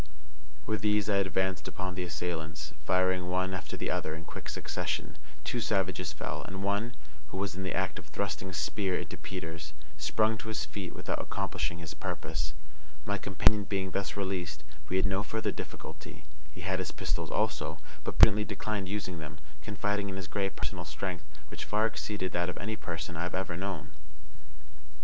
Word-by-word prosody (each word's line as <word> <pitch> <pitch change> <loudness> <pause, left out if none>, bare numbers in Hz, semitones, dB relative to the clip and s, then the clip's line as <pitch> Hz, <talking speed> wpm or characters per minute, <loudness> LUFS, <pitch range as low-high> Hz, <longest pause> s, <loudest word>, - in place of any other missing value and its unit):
With 110 - +1
these 105 -1 +4
I 100 - +5
advanced 95 -1 +2
upon 95 -1 -2
the 90 - -2
assailants, 80 -3 -2
firing 95 -1 +4
one 95 +1 +2
after 85 -5 -3
the - - 0
other 80 - 0
in 80 +1 -7
quick - - -6
succession. - - -1 0.2
Two 85 +10 0
savages 95 -6 +2
fell, 75 - -2
and 95 +1 -4
one, 100 +4 +1 0.3
who 85 - -5
was 95 -3 0
in 95 - -3
the 95 -2 0
act 95 0 +1
of - - -11
thrusting 95 -2 -1
a - - -6
spear 95 +1 +1
into - - -4
Peters, 80 -4 -5 0.3
sprung 110 +8 +3
to - - -6
his 105 -9 0
feet 90 +4 -4
without - - -1
accomplishing 85 - -1
his 80 -2 -5
purpose. 75 0 -2 0.5
My 100 +1 +1
companion 100 +1 +5
being 95 -2 0
thus 100 +1 -1
released, 90 -6 -1 0.3
we 95 - +3
had 95 - +4
no 95 +1 +3
further 110 +1 0
difficulty. - - -7 0.3
He 90 - -9
had 95 +1 +1
his 95 - -1
pistols - - 0
also, - - +1 0.3
but - - -2
prudently 105 +2 +10
declined 105 -4 -1
using 95 -4 -2
them, 75 -2 -6 0.2
confiding 105 +3 0
in 95 - -3
his 95 -1 -3
great 100 0 0
personal - - -2
strength, 90 -4 -3 0.3
which - - -4
far 105 +1 +3
exceeded 105 -4 -1
that 90 0 +2
of - - -4
any 110 +4 -1
person 85 -4 -3
I 80 - -1
have 90 +1 0
ever 95 -2 0
known. 90 -5 -3
95 Hz, 180 wpm, -32 LUFS, 85-100 Hz, 0.5 s, prudently